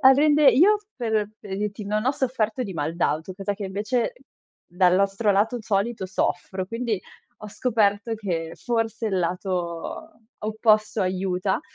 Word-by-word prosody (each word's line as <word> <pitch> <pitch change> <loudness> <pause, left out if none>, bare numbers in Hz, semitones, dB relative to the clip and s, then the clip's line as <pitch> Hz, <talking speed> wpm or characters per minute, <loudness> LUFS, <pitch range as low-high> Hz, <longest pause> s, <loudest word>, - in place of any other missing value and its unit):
a 265 -1 +8
rende 295 +1 +5
io, 390 +10 +5 0.2
per 220 -4 0
pre 195 -2 -6
dirti, 210 0 -3
non 210 +2 -1
ho 265 - +3
sofferto 250 -3 -1
di 200 -5 -5
mal 155 0 -2
d'auto, 165 +2 -1
cosa 200 +1 -3
che 200 - -6
invece 210 - -1 0.5
dal 180 0 +3
nostro 200 +2 +2
lato 220 +5 +2
solito 205 0 -1
soffro, 185 0 -2
quindi 230 -2 -2 0.5
ho 210 - -6
scoperto 215 -1 +1
che 170 -6 -3
forse 225 -1 -2
il 190 -2 0
lato 180 - -3 0.2
opposto 215 -1 +2
aiuta. 185 0 0
210 Hz, 150 wpm, -24 LUFS, 190-230 Hz, 0.5 s, a